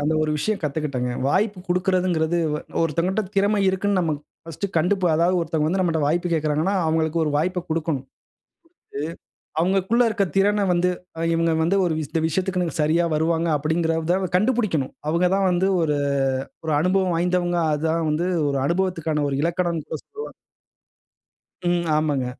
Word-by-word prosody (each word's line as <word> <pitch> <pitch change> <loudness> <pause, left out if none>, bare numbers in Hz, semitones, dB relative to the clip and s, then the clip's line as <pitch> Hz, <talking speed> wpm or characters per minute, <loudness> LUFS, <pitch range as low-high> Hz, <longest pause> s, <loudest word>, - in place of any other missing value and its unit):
அந்த 150 +2 +1
ஒரு 155 - 0
விஷயம் 215 +6 -1
கத்துக்கிட்டேங்க. 140 -4 -2
வாய்ப்பு 195 +6 +1
குடுக்கிறதுங்குறது, 180 -2 +1 0.2
ஒ - - -1 0.2
ஒருத்தவகட்ட 170 +6 0
திறமை 200 +1 +3
இருக்குன்னு 190 +1 +1
நம்ம 165 -3 0 0.3
ஃபர்ஸ்ட் 165 +4 -5
கண்டு 175 +5 +3
இப்ப 185 -2 0
அதாவது 175 +3 +2
ஒருத்தவங்க 155 -2 0
வந்து 190 +2 0
நம்மள்ட்ட 165 -4 +1
வாய்ப்பு 175 +3 0
கேக்குறாங்கன்னா, 155 +5 0
அவுங்களுக்கு 160 0 +1
ஒரு 150 - -1
வாய்ப்ப 180 +3 -1
குடுக்கணும். 160 -2 0
குடுத்து - - -58 1.5
அவுங்களுக்கு 190 +3 +1
உள்ள 245 0 +5
இருக்க 210 -2 +1
திறன 205 +1 +3
வந்து, 175 +1 +2 0.3
"அ - - -4
இவுங்க 165 0 +2
வந்து 175 +5 +2
ஒரு 170 - +1
இந்த 160 +3 -2
விஷயத்துக்குன்னு 180 0 -1
சரியா 160 +3 +2
வருவாங்க" 165 +2 +1
அப்படிங்குகறத 160 +3 0 0.2
கண்டுபுடிக்கணும். 210 - 0 0.2
அவுங்க 170 +3 +2
தான் 195 -1 +2
வந்து 180 +2 +2
ஒரு 150 -2 +1 0.7
ஒரு 155 - 0
அனுபவம் 185 +1 +2
வாய்ந்தவங்க. 175 0 +1 0.2
அதான் 160 +2 0
வந்து 160 +4 0 0.2
ஒரு 140 -1 0
அனுபவத்துக்கான 165 -3 0
ஒரு 135 - -2
இலக்கணம்ன்னு 170 -1 -1
கூட 160 - -3
சொல்லுவாங்க. 435 +3 -8 1.3
ம் 175 -1 +1
ஆமாங்க. 145 -4 0
170 Hz, 155 wpm, -23 LUFS, 155-185 Hz, 1.5 s, உள்ள